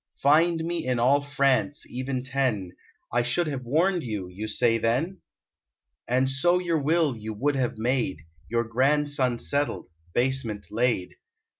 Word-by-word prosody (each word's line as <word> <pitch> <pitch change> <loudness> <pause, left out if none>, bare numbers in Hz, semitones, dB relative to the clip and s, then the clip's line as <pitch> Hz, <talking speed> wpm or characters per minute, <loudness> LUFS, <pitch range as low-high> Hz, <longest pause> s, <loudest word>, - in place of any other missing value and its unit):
Find 160 +3 +4
me 170 -3 -3
in 125 -1 +1
all 135 +4 +4
France 140 0 +1
even 130 0 -3
ten; 130 -9 -1 0.4
I 120 - +3
should 125 +9 0
have 140 -4 -3
warned 170 +8 +2
you, 105 -8 -4
you 100 +4 -6
say 115 +1 +2
then? 130 - 0 0.9
And 130 +2 +2
so 175 +7 +3
your 170 -3 0
will 155 -1 +2
you 110 -1 -6
would 145 +6 0
have 125 -4 -1
made, 115 - -1 0.3
Your 115 0 +1
grandson 130 +1 +1
settled; 140 -7 -2 0.2
basement 120 -5 -1
laid. 115 -5 0
130 Hz, 145 wpm, -26 LUFS, 115-145 Hz, 0.9 s, Find